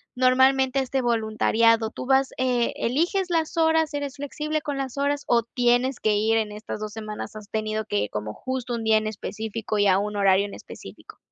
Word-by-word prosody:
normalmente 260 +1 +3
a - - +2
este 265 +1 -1
voluntariado? 225 -1 +2
Tú - - -7
vas, 270 0 +3
eh, 250 -2 +1
eliges 345 - 0
las 325 -1 0
horas, 320 -1 +3
eres 285 -1 -4
flexible 300 +2 -3
con 290 -2 -4
las 270 -1 -4
horas, 285 +1 0
¿o 235 -1 +4
tienes 245 +2 +1
que 215 -1 +2
ir 220 +2 +2
en 215 -1 -1
estas 210 +1 -6
2 215 0 -6
semanas, 215 -1 -7
has 210 -1 -10
tenido 215 0 -2
que 105 - -1
como 105 0 -4
justo 255 - -4
un 230 - -4
día 220 0 +4
en 215 0 -1
específico, 220 +1 -4
y 205 - +4
a 185 - +5
un 210 +1 -3
horario 195 0 +3
en 205 - -8
específico? - - -12
235 Hz, 200 wpm, -24 LUFS, 215-270 Hz, -, a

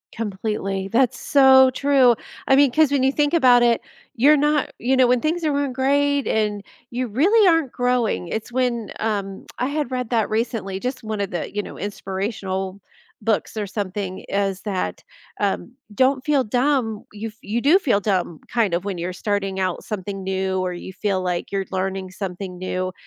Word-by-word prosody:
Completely, 195 -2 -3
that's 240 +3 +1
so 265 -2 +6
true, 265 -3 +4 0.3
I 270 - +5
mean, 280 -2 +5
'cause 305 0 +3
when 275 -2 +2
you 270 - +4
think 290 0 +1
about 255 -7 +6
it, 235 -1 +4 0.4
you're 290 +6 +6
not 295 0 +1
you 260 +2 +1
know, 260 - +6
when 245 0 +2
things 330 +2 -1
were 300 - +2 0.2
go - - -5
great, 280 +2 +1
and 210 -2 0 0.3
you 250 +1 -2
really 380 - +4
aren't 325 -7 +3
growing, 245 -7 0
it's 220 +6 -4
when, 240 -4 -1
um 200 -3 -3
I 250 - +1
had 290 -3 -2
read 250 -2 -2
that 225 -3 +1
recently, 215 -4 -2
just 250 +1 -4
one 215 -1 -3
of 195 - -2
the, 175 - -4
you 205 - +1
know, - - -10
inspirational 195 -1 -4 0.4
books 220 +1 -1
or 205 -2 -2
something, 195 -2 -4
is 195 -1 -1
that, 195 -4 -3 0.4
um, 205 +4 -1 0.2
don't 260 +3 +2
feel 290 -3 +3
dumb, 245 -2 0
you 210 +2 -6
f 215 - -10
you 220 +4 -2
do 305 +8 +6
feel 240 - +2
dumb 185 -6 -1
kind 220 -7 +1
of 175 +3 -1
when 195 -3 -3
you're 175 +2 -3
starting 195 0 -2
out 185 -2 -1
something 195 -1 -5
new, 190 0 -1
or 185 -1 -1
you 180 +2 -8
feel 190 -1 -1
like 180 0 -3
you're 195 -1 -1
learning 190 0 -3
something 185 -1 -6
new, 185 0 -3
220 Hz, 185 wpm, -22 LUFS, 195-260 Hz, 0.4 s, so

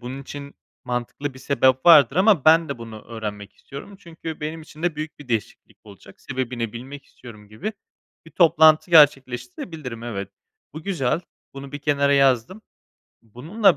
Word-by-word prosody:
bunun 130 +3 -7
için 140 0 -9 0.3
mantıklı 125 +3 -4
bir - - -12
sebep 130 0 +1
vardır 140 -4 +7
ama 190 -6 +4
ben 160 +1 +5
de 140 - -5
bunu 115 -2 -10
öğrenmek 105 -3 -7
istiyorum 145 +9 -11
çünkü 165 -3 -9
benim 155 +1 -5
için 155 0 -14
de 170 -3 -1
büyük 155 0 -6
bir 145 - -13
değişiklik 115 -3 -4
olacak. 100 -1 -16
Sebebini 125 -4 -4
bilmek 135 +4 -9
istiyorum." 105 -4 -15
gibi 185 - -5 0.5
bir - - -13
toplantı 160 -1 +4
gerçekleştirebilirim. 130 -3 +2
Evet, 100 -5 -5 0.4
bu 155 - -9
güzel, 160 -5 -1 0.3
bunu 135 0 -9
bir 145 - -5
kenara 140 -1 +1
yazdım. 135 - +2 0.6
Bununla 155 - +1
140 Hz, 155 wpm, -22 LUFS, 120-160 Hz, 0.6 s, vardır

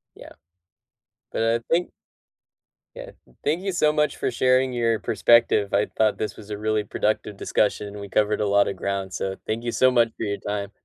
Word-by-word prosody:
Yeah. - - -13 1.0
But - - -1
I 115 +1 +2
think 175 +2 +1 1.1
Yeah. - - -9 0.3
Thank 165 +6 0
you 195 - -1
so 155 -4 +2
much 150 0 0
for - - -1
sharing 130 +1 +2
your 115 -3 0
perspective. 115 -4 +3
I 100 - +2
thought 110 -1 +2
this 105 -2 -3
was 105 0 -11
a 105 - -3
really 110 0 0
productive 105 0 -2
discussion; 105 0 -1
we 100 - -7
covered 105 +1 +1
a 105 - +1
lot 100 0 +3
of 100 - -3
ground, 95 0 -3
so 95 0 -3
thank 115 +2 -2
you 120 - -2
so 130 - +4
much 120 -2 +3
for - - -5
your 100 -1 -2
time. 100 0 -4
110 Hz, 195 wpm, -24 LUFS, 100-120 Hz, 1.1 s, so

